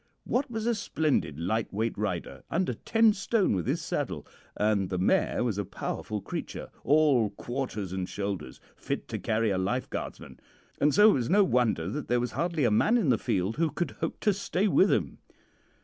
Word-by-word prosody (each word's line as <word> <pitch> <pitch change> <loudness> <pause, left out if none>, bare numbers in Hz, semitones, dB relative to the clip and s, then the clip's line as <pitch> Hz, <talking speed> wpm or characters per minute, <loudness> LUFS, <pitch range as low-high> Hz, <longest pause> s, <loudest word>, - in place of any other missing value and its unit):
Wat 255 +2 0
was 225 -2 -3
a 235 - +2
splendid 150 - 0
lightweight 110 +4 -1
rider 100 -4 -3
under 185 - 0
ten 225 -1 +3
stone 200 - +1
with 90 -4 -2
his - - -1
saddle - - -3 0.3
and 105 -3 +1
the 90 - -2
mare 90 - +2
was 110 -5 -1
a - - 0
powerful 105 +2 -4
creature, - - -6
all 140 -6 +4
quarters 110 -3 -4
and 95 -1 -3
shoulders, 100 -9 -4 0.2
fit - - -4
to - - -3
carry 110 -1 0
a 95 - 0
lifeguardsman; 95 - -4 0.4
and 150 - +4
so 210 +1 +8
it - - +3
was 120 -4 -1
no 200 +3 +5
wonder 120 - +1
that 140 +10 -4
there 120 0 +2
was 120 -1 -2
hardly 165 +3 -1
a 120 - +3
man 215 - +4
in 195 - +1
the 120 - +3
field 95 +4 -1
who 165 0 +2
could 170 -1 -3
hope 165 - -4
to 210 - +3
stay 200 0 0
with 195 0 +4
him. - - 0
120 Hz, 190 wpm, -28 LUFS, -, 0.4 s, so